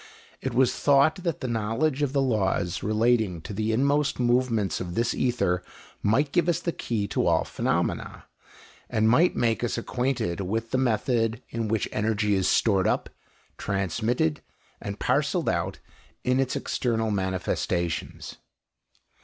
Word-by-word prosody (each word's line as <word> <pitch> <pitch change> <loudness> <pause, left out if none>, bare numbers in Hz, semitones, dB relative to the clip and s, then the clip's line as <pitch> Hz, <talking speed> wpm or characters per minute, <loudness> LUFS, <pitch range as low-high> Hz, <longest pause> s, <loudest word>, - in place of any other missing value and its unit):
It 130 -2 -3
was 130 0 +4
thought 145 +4 +3
that 170 -5 -3
the 130 - -2
knowledge 120 +6 0
of 145 -3 +1
the 140 -1 +2
laws 95 -8 0
relating 110 -3 +1
to 105 - -7
the 110 +2 -1
inmost 140 +5 +1
movements 120 -5 +1
of 90 -1 -5
this 115 0 +1
ether 90 -8 0 0.4
might 135 +8 +2
give 175 -1 +2
us 170 - +1
the 170 - -2
key 110 -9 -2
to - - 0
all - - +3
phenomena, - - -2 0.6
and 110 0 +2
might 165 +11 +4
make 115 0 +1
us 120 - -1
acquainted 120 -7 -1
with 110 +4 -3
the 130 - +1
method 115 -1 0
in 115 -1 -3
which 110 0 0
energy 105 -1 0
is 95 -1 +1
stored 95 -5 +3
up, - - -1 0.5
transmitted, 100 -3 -1 0.4
and - - -5
parcelled - - +1
out - - -1 0.5
in 125 +1 +2
its 135 -1 0
external 115 -3 -1
manifestations. 90 -3 -2
115 Hz, 145 wpm, -26 LUFS, 105-130 Hz, 0.6 s, was